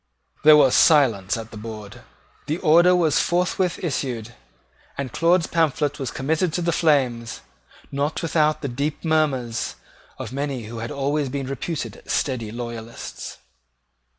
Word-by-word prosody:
There 150 0 +9
was 135 -4 +5
silence 115 - +4
at 115 0 -8
the 110 - -9
board. 105 -2 -9 0.5
The 155 +2 -1
order 175 +2 +5
was 165 -4 +3
forthwith 180 +1 0
issued; 120 -8 -3 0.6
and 135 -3 -4
Claude's 170 +3 +3
pamphlet 150 -3 0
was 135 -3 -3
committed 160 +5 -1
to 175 - -1
the 170 - +1
flames, 130 -9 +1 0.5
not 145 +4 -2
without 155 -1 +1
the - - -1
deep 140 +6 -3
murmurs 135 -8 0 0.4
of 120 - -7
many 140 -3 -3
who 115 +2 -7
had 115 - -4
always 145 0 -1
been 140 +1 -3
reputed 135 - -5
steady 120 -6 -1
loyalists. 115 -1 -7
140 Hz, 140 wpm, -23 LUFS, 120-155 Hz, 0.6 s, There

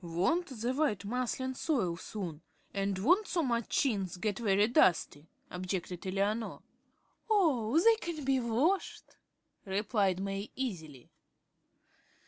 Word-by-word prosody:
"Won't 185 - 0
the 245 -1 -3
white 260 -9 0
muslin 255 +3 -2
soil 245 - 0
soon, 170 -3 -6 0.3
and 195 -1 -1
won't 360 - +3
so 340 -2 0
much 235 -4 -1
chintz 195 -9 0
get 205 +2 -2
very 205 -2 +3
dusty?" 165 -8 +2 0.2
objected 180 0 -4
Eleanor. 200 +4 -1 0.7
"Oh, 310 - +3
they 450 +5 +5
can 335 -8 -5
be 270 -1 +3
washed," 255 - -1 0.5
replied 200 -1 0
May, 195 +1 -3
easily. 160 - -5
215 Hz, 115 wpm, -32 LUFS, 190-265 Hz, 0.7 s, they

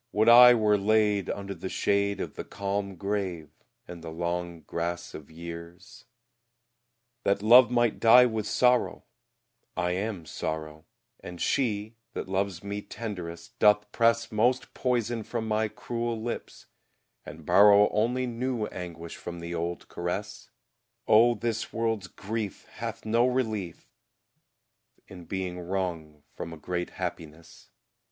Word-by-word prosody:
Would 110 +2 +4
I 125 +1 +10
were 105 -2 +3
laid 105 -1 +2
Under 100 -1 -4
the 95 - -6
shade 100 0 0
Of - - -5
the - - -6
calm 100 0 -3
grave, 95 -5 -3 0.4
and 85 -1 -9
the 80 - -6
long 85 0 -3
grass 85 +2 -4
of 75 - -10
years, 85 +2 -10 1.2
That 100 0 0
love 120 +3 +8
might 120 -2 +1
die 125 +2 +8
with 110 -3 -2
sorrow: 125 -1 +2 0.7
I 90 0 0
am 95 -2 -3
sorrow; 80 0 -5 0.3
And 90 -1 -9
she, 110 -4 -1 0.2
that - - -5
loves 95 -1 -2
me 100 +1 -4
tenderest, 90 -6 -7
doth 105 0 +4
press 115 0 +2
Most 120 +4 +1
poison 120 -2 -1
from 110 +1 -4
my 110 0 +1
cruel 115 +1 -4
lips, 115 +2 -6 0.6
and 80 0 -11
borrow 100 +3 +7
Only 120 +4 +1
new 120 -1 -2
anguish 85 -4 -7
from 85 0 -7
the 85 0 -6
old 85 +1 -4
caress; 90 +4 -5 0.6
Oh, 120 +2 +6
this 115 +1 -3
world's 115 -4 -1
grief 105 +2 -5
Hath 115 -1 -5
no 115 +3 +3
relief 110 -9 -2 1.2
In 90 -3 -11
being 90 0 -4
wrung 85 -5 -4
from 85 - -7
a - - -9
great 90 +3 -3
happiness. 85 -3 -7
100 Hz, 135 wpm, -28 LUFS, 85-115 Hz, 1.2 s, I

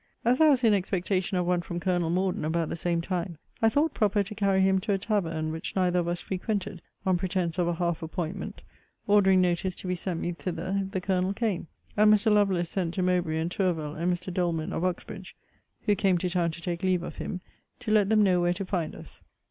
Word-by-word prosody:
As 250 +5 +3
I 315 - +7
was 265 -3 +3
in 225 -2 +5
expectation 190 0 0
of 180 - +1
one 180 0 +1
from 175 0 -5
Colonel 175 -2 0
Morden 185 0 0
about 160 +1 0
the - - -3
same 170 0 0
time, 170 -1 -3 0.2
I 225 - +5
thought 290 +5 +1
proper 210 -2 +2
to 205 +2 -8
carry 195 -2 +2
him 190 0 +4
to 205 +2 -1
a - - +2
tavern 165 -7 -1
which 160 0 -5
neither 180 -2 +2
of 170 - -1
us 175 0 -1
frequented, 195 -1 -3 0.2
(on 185 -2 +3
pretence 180 -2 -1
of 175 - +2
a 175 - 0
half 170 -1 -1
appointment;) 165 +2 -5 0.4
ordering 195 -2 +5
notice 180 +1 0
to - - -8
be 180 - 0
sent 180 -1 -3
me 175 - -2
thither, 180 +2 -3
if 190 - -6
the 190 - -1
Colonel 185 0 0
came; 210 -8 -1 0.3
and 210 0 +6
Mr. 215 +1 +4
Lovelace 190 -5 +2
sent 180 -3 -2
to 185 - 0
Mowbray, 180 -3 +1
and 165 +2 -1
Tourville, 165 -6 -1
and 170 +4 0
Mr. 180 +1 -3
Doleman 170 -3 -1
of 165 - -2
Uxbridge, 190 +1 -4 0.5
(who 205 - +3
came 190 -2 +2
to 180 +1 -2
town 175 -2 +1
to 165 +1 -8
take 170 -1 -3
leave 185 -2 +1
of - - -7
him,) 185 - -4 0.4
to 235 -3 -3
let 210 -2 +4
them 215 -1 +5
know 180 -3 +3
where 175 0 +2
to 195 +2 -5
find 175 -4 -2
us. - - -13
185 Hz, 230 wpm, -27 LUFS, 175-195 Hz, 0.5 s, I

